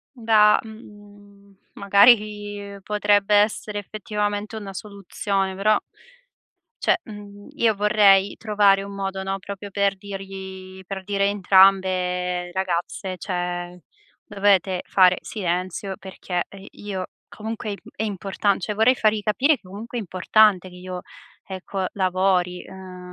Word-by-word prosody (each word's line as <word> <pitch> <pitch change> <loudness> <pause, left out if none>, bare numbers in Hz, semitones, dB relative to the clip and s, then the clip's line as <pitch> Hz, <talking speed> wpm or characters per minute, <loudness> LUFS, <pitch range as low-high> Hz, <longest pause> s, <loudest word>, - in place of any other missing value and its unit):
Da 220 -3 +4
mhmm, 205 -2 -15 0.2
magari 205 -1 +3
potrebbe 205 0 +2
essere 210 0 +1
effettivamente 210 +1 -3
una 205 -3 -7
soluzione, 195 -1 -3
però 210 +2 +3 1.0
cioé, - - +2
mhmm, 205 -2 -11
io 225 -2 +2
vorrei 200 -1 +4
trovare 205 -2 +3
un 200 0 -8
modo, 195 -1 -3
no, 195 0 -2
proprio 200 +1 -8
per 200 -1 +1
dirgli 190 -1 -9
per 190 0 -6
dire 200 0 0
a - - +3
entrambe: 185 -2 +3
"Ragazze, 185 0 -3
cioé 175 0 -4 0.5
dovete 195 -2 +2
fare 185 -1 +5
silenzio 185 0 -3
perché, 185 -2 -4
ehm, 195 -1 -12
io 195 -3 -5 0.2
comunque 220 0 -6
é - - -2
im - - -8 0.2
è 220 - -1
importante". 200 -1 -1
Cioé, 210 - -2
vorrei 225 +5 +4
fargli 215 -2 +1
capire 255 +9 +2
che - - -36
comunque 220 +6 -7
è - - -2
importante 185 +1 +3
che 180 - -14
io, 180 0 -7 0.4
ecco, 190 0 -4
lavori. 185 -1 +1
Ehm 185 -1 -11
200 Hz, 130 wpm, -23 LUFS, 185-210 Hz, 1.0 s, fare